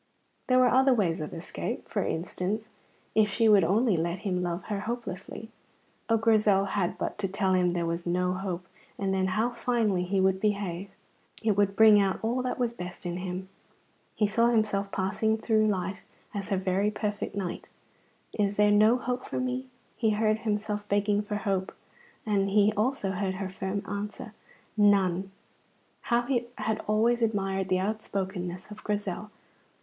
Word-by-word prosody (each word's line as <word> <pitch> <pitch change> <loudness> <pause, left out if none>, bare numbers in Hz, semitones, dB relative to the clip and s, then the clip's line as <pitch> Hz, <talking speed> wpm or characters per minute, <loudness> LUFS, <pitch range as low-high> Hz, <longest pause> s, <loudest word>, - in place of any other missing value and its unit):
There 255 - +4
were 255 0 +6
other 265 0 +4
ways 175 -8 0
of 150 - -5
escape. 165 - -5
For - - -1
instance, 190 +6 -3 0.4
if 215 -1 +4
she 225 +3 +2
would 205 -3 +6
only 205 +5 +3
let 170 +2 -1
him 180 -2 0
love 175 0 -2
her 205 -2 -3
hopelessly. 220 -1 -6 0.6
Oh, 225 - +4
Grizel 215 -3 +3
had 190 -3 -1
but - - -4
to 200 - 0
tell 190 0 0
him 180 -1 +3
there 175 -1 -1
was 170 +1 -3
no 180 +1 +1
hope, 185 -1 -4 0.3
and 195 -1 -1
then 190 0 +1
how 220 +6 0
finely 230 -7 0
he 195 +2 0
would 190 0 +2
behave! 200 -3 -1 0.5
It 220 - +3
would 200 -1 +2
bring 215 -1 +7
out 195 -1 +1
all 240 +3 0
that 250 0 -2
was 240 -2 0
best 180 -4 -8
in 175 0 -2
him. 185 0 -5 0.7
He 210 - +2
saw 230 +3 +3
himself 210 -4 +1
passing 215 +3 0
through 220 -1 +2
life 195 -1 -2 0.3
as 200 -2 -4
her 195 - +1
very 190 +2 +1
perfect 210 -1 -3
knight. 190 -3 -4 0.6
"Is 205 -1 0
there 210 0 +5
no 215 +4 +5
hope 250 0 -3
for - - -4
me?" 255 +1 -2 0.3
He 225 - +1
heard 215 0 +2
himself 210 -1 -2
begging 205 0 +2
for 210 0 -4
hope, 195 -2 -2 0.5
and 200 -2 +1
he 205 +1 +4
heard 215 - -3
also 215 -2 0
her 190 0 -2
firm 190 +1 -3
answer: 205 +2 -5 0.4
"None!" 195 -3 +3 0.8
How 240 0 +3
he 240 -2 -1
had 220 0 -1
always 230 +3 +2
admired 195 -4 0
the 185 - +3
outspokenness 190 -2 -3
of 210 - -10
Grizel. 205 0 -3
205 Hz, 170 wpm, -28 LUFS, 190-220 Hz, 0.8 s, bring